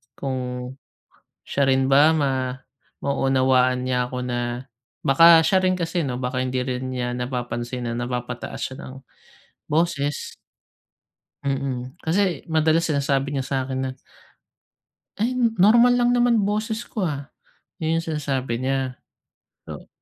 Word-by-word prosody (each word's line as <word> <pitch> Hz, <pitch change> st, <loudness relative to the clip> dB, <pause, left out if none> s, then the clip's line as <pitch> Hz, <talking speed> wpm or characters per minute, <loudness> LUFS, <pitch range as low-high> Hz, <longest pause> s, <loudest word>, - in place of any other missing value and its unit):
kung 125 Hz, -2 st, -4 dB, 0.7 s
siya 140 Hz, -1 st, 0 dB
rin 135 Hz, 0 st, +2 dB
ba 150 Hz, +4 st, +6 dB
ma 130 Hz, -4 st, 0 dB, 0.5 s
maunawaan 130 Hz, -2 st, +2 dB
niya 125 Hz, -1 st, 0 dB
ako 125 Hz, 0 st, -6 dB
na 120 Hz, -1 st, -2 dB, 0.6 s
baka 165 Hz, +4 st, +7 dB
siya 185 Hz, +4 st, +3 dB
rin 185 Hz, 0 st, +3 dB
kasi 170 Hz, -3 st, -2 dB
'no, 125 Hz, -, -2 dB
baka 125 Hz, 0 st, -2 dB
hindi 130 Hz, 0 st, -1 dB
rin 130 Hz, 0 st, -3 dB
niya 125 Hz, -1 st, -2 dB
napapansin 120 Hz, -1 st, -3 dB
na -, -, -3 dB
napapataas 120 Hz, 0 st, -4 dB
siya 130 Hz, -, -4 dB
ng 130 Hz, -, -9 dB, 0.8 s
boses. 150 Hz, -2 st, 0 dB, 1.1 s
Mm. 135 Hz, -2 st, -2 dB
Kasi 175 Hz, -1 st, 0 dB
madalas 160 Hz, +1 st, +2 dB
sinasabi 140 Hz, -1 st, 0 dB
niya 135 Hz, -, -1 dB
sa 135 Hz, 0 st, -2 dB
'kin 130 Hz, 0 st, -3 dB
na, 130 Hz, -, -2 dB, 1.3 s
"Ay 230 Hz, +4 st, 0 dB, 0.3 s
normal 235 Hz, +4 st, +6 dB
lang 245 Hz, 0 st, +3 dB
naman 240 Hz, -3 st, +3 dB
boses 215 Hz, +2 st, -1 dB
ko, 210 Hz, -5 st, -3 dB
ah." 140 Hz, -1 st, -4 dB, 0.5 s
Yun 165 Hz, +1 st, 0 dB
yung -, -, -12 dB
sinasabi 135 Hz, -6 st, -2 dB
niya. 130 Hz, 0 st, -2 dB, 0.7 s
So, -, -, -9 dB
135 Hz, 130 wpm, -23 LUFS, 125-165 Hz, 1.3 s, baka